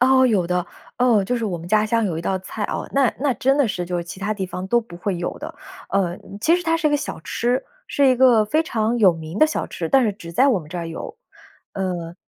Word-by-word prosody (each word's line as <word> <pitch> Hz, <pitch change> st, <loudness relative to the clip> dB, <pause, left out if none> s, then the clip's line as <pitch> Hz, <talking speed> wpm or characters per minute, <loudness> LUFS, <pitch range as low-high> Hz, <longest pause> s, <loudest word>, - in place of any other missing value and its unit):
哦， 260 Hz, +1 st, +5 dB
有 200 Hz, -8 st, +2 dB
的。 180 Hz, +1 st, -1 dB, 0.3 s
哦， 235 Hz, -5 st, +4 dB
就 245 Hz, +5 st, -1 dB
是 230 Hz, -, -2 dB
我 185 Hz, -5 st, -2 dB
们 165 Hz, -, -9 dB
家 215 Hz, +3 st, +3 dB
乡 230 Hz, +1 st, +1 dB
有 180 Hz, -6 st, -1 dB
一 -, -, -3 dB
道 190 Hz, +2 st, 0 dB
菜 190 Hz, +3 st, -7 dB
哦， -, -, -3 dB
那 275 Hz, -3 st, +3 dB
那 280 Hz, 0 st, +1 dB
真 270 Hz, +3 st, +2 dB
的 285 Hz, -, +4 dB
是 180 Hz, -4 st, -2 dB
就 175 Hz, 0 st, -3 dB
是 170 Hz, -, -3 dB
其 175 Hz, +3 st, -9 dB
它 205 Hz, +2 st, -1 dB
地 195 Hz, -3 st, -3 dB
方 180 Hz, 0 st, -6 dB
都 240 Hz, +3 st, +3 dB
不 200 Hz, -7 st, -12 dB
会 185 Hz, +1 st, -2 dB
有 175 Hz, -, -4 dB
的。 310 Hz, +3 st, -7 dB, 0.4 s
呃， 185 Hz, -3 st, 0 dB, 0.2 s
其 325 Hz, +9 st, +4 dB
实 355 Hz, -, -4 dB
它 330 Hz, 0 st, +1 dB
是 330 Hz, -2 st, 0 dB
一 -, -, +3 dB
个 295 Hz, -, +3 dB
小 280 Hz, -, -5 dB
吃， 240 Hz, -, -1 dB, 0.2 s
是 280 Hz, -, +3 dB
一 260 Hz, -, +5 dB
个 245 Hz, -4 st, +5 dB
非 310 Hz, +10 st, +1 dB
常 225 Hz, -4 st, -1 dB
有 190 Hz, -5 st, +6 dB
名 160 Hz, +2 st, -8 dB
的 -, -, +7 dB
小 310 Hz, -, -2 dB
吃， 165 Hz, -, -4 dB
但 265 Hz, +5 st, +4 dB
是 210 Hz, -, +1 dB
只 175 Hz, -4 st, -10 dB
在 255 Hz, +11 st, +4 dB
我 235 Hz, -, +3 dB
们 150 Hz, -, -13 dB
这 175 Hz, +3 st, -5 dB
儿 170 Hz, -, -4 dB
有。 165 Hz, -, -7 dB, 0.6 s
呃 175 Hz, -3 st, -3 dB
210 Hz, 295 characters per minute, -22 LUFS, 180-255 Hz, 0.6 s, 的